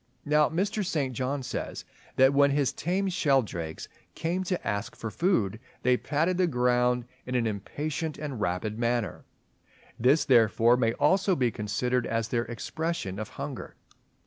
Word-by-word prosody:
Now 150 0 +4
Mr. 205 +5 -1
St. 145 -8 -1
John 130 +3 -2
says, - - -5 0.3
that 130 +1 +5
when 140 0 +5
his 140 -1 +1
tame 185 +7 -1
Sheldrakes 135 - 0 0.3
"came 175 +3 -1
to 180 0 -2
ask 100 +1 -2
for 115 - -5
food, 110 - +1 0.2
they 125 0 +4
patted 165 +8 0
the 180 - +4
ground 125 -2 +2 0.2
in 125 - -2
an 120 -2 +2
impatient 145 - -3
and 140 -7 -5
rapid 105 +4 -2
manner." 120 -2 -1 0.7
This 135 +7 +4
therefore 115 -1 +5
may 115 -2 +1
almost 190 +4 +2
be 125 -3 +2
considered 120 +4 -1
as 115 0 -1
their 120 -1 0
expression 120 - -4
of 110 - -5
hunger. - - -6
125 Hz, 150 wpm, -28 LUFS, 115-155 Hz, 0.7 s, that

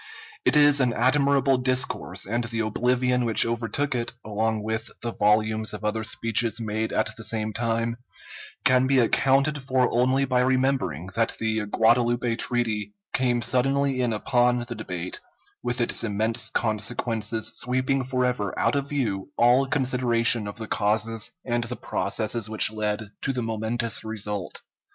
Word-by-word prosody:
It - - +4
is 145 -1 +6
an 125 -2 +2
admirable 135 +1 +3
discourse, 130 +1 0
and 120 +4 -1
the 115 0 -2
oblivion 125 +3 +1
which 115 -2 +4
overtook 120 +4 -1
it, 120 -2 -3
along 110 0 -1
with 110 +1 -3
the 115 -1 -3
volumes 110 +1 +1
of 105 - -8
other 110 +1 -1
speeches 115 +1 +1
made 110 0 -2
at - - -1
the 115 - -9
same 110 -1 -2
time, 115 0 -1 0.7
can 130 -1 +4
be 135 0 +3
accounted 135 +4 +3
for 130 -1 +1
only 130 +3 +2
by 125 -1 +1
remembering 130 - 0
that 115 0 0
the 110 -1 -1
Guadalupe 120 +2 +2
Treaty 110 -4 -1 0.2
came 120 -2 +1
suddenly 135 +2 +1
in 120 -2 +1
upon 120 +2 +1
the 120 - -4
debate, 90 -5 -5 0.4
with 120 0 -2
its 120 - 0
immense 110 +2 0
consequences 110 0 -1
sweeping 130 +2 0
forever 125 -5 -1
out - - +1
of 140 0 -2
view 110 -9 -2
all 125 +3 +4
consideration 120 -5 +1
of 100 - -7
the 110 -1 -6
causes 110 +1 -1 0.2
and 120 -1 -1
the 125 +2 -5
processes 110 +2 -2
which 110 0 +2
led 105 -1 -3
to 135 - -1
the 125 -2 -3
momentous 115 +1 -1
result. 105 -3 -5
115 Hz, 150 wpm, -25 LUFS, 110-125 Hz, 0.7 s, is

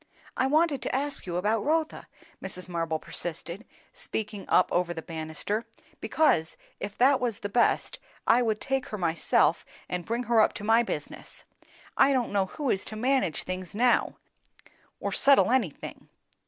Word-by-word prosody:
"I 260 - +1
wanted 300 -1 +2
to - - -2
ask 285 -5 -2
you 175 - -3
about 210 +3 +1
Rotha," 315 +1 -1 0.4
Mrs. 185 -1 -7
Marble 165 -2 -2
persisted, 170 +5 -6 0.3
speaking 210 -2 -5
up 180 - +4
over 175 -1 0
the 160 - -6
bannisters, 160 +7 -3 0.4
"because, 160 - +1 0.2
if 200 0 -6
that 265 +2 +5
was 240 -5 -2
the 205 - -3
best, 235 +4 +1 0.3
I 245 - +5
would 220 -3 0
take 270 -1 -1
her 210 - -5
myself 165 -2 +2 0.2
and 180 -1 -3
bring 235 +4 -2
her 230 -1 +4
up - - +3
to - - -8
my 225 +2 +4
business. 235 - -6 0.5
I 275 +1 +5
don't 250 -3 0
know 195 -2 +2
who 285 +5 -2
is 195 - -1
to 215 - -6
manage 250 - 0
things 185 0 -6
now, 245 +2 +2 0.8
or - - -3
settle 275 -3 +5
anything." 230 - -2
215 Hz, 165 wpm, -27 LUFS, 180-255 Hz, 0.8 s, that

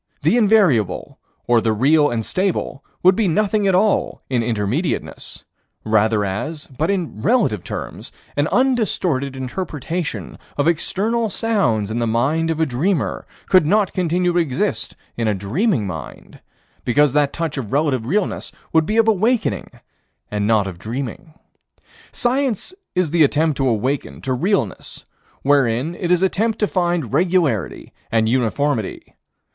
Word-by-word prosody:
The - - +3
invariable, 200 - +2 0.3
or 120 -1 +3
the 110 -1 +1
real 145 +7 +4
and 115 -2 -2
stable, 185 -7 -1 0.2
would 185 +1 +6
be 220 -1 +1
nothing 205 +3 +1
at 190 - +3
all 205 +2 +1
in 125 -2 +2
Intermediateness 115 - -2 0.4
rather 110 -1 +2
as, 150 +11 -4
but 150 +6 -3
in 175 - -2
relative 170 - +2
terms, - - -6 0.2
an 145 +1 +1
undistorted 185 - +1
interpretation 155 +4 -4 0.2
of 145 - +1
external 215 +7 0
sounds 120 - 0
in 115 - -1
the 115 - 0
mind 140 +9 +1
of 160 -1 -1
a 160 - +3
dreamer 155 +6 -1 0.2
could 185 -5 +5
not 205 +1 +2
continue 180 0 +1
to 175 - +3
exist 145 -7 -1 0.2
in 115 -1 0
a 105 - +1
dreaming 120 - 0
mind, 80 -8 -8 0.4
because 140 +2 +3
that 145 -1 +2
touch 160 -4 -3
of 110 -6 -6
relative 135 -5 0
realness 200 +6 -1 0.2
would 160 -1 +3
be 215 - 0
of 225 0 +4
awakening 220 - +1 0.6
and 105 -1 -1
not 110 -3 +3
of 90 -3 -7
dreaming. 130 - -6 0.8
Science 255 - -1 0.2
is 180 -4 +1
the 170 -1 +4
attempt 150 +1 +2
to 135 - +1
awaken 125 +5 -2
to 130 - -2
realness, 140 - -2 0.4
wherein 135 +1 +2
it 175 0 -4
is 180 +1 +3
attempt 215 +4 +1
to 210 - +2
find 175 - -1
regularity 170 - 0 0.2
and 110 -1 +2
uniformity. 125 -1 -1
150 Hz, 145 wpm, -20 LUFS, 120-185 Hz, 0.8 s, would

